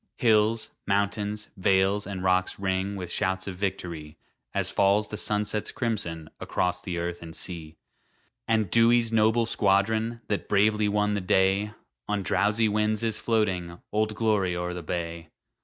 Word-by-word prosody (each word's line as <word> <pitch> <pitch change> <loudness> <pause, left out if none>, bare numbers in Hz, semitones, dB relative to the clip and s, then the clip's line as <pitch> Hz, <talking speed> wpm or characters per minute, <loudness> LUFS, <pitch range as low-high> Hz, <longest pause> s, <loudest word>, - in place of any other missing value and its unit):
Hills, 110 -1 +2 0.2
mountains, 100 +1 -1
vales, 95 +2 +2
and 95 -2 -5
rocks 95 0 +1
ring 95 +1 -1
With 90 -2 -5
shouts 95 +1 -1
of 95 - -5
victory, 85 -6 -4 0.3
As - - 0
falls 100 +2 +2
the - - -5
sunset's 105 0 -1
crimson 95 -10 -3
Across 90 0 0
the 90 -3 -4
earth 85 0 -3
and 80 -1 -9
sea. 80 -4 -6 0.7
And 110 -4 +1
Dewey's 115 0 +5
noble 110 +1 +3
squadron, 110 +2 +1
That 105 - -2
bravely 105 +1 +3
won 105 0 +1
the 100 - -1
day, 95 +3 +2 0.3
On 105 -1 -1
drowsy 105 +4 +2
winds 105 +1 +1
is 110 -2 0
floating 95 -7 -1
"Old 110 0 0
Glory" 100 -5 +1
o'er 90 0 -3
the 90 - -5
bay. 85 -1 -4
100 Hz, 150 wpm, -27 LUFS, 90-110 Hz, 0.7 s, Dewey's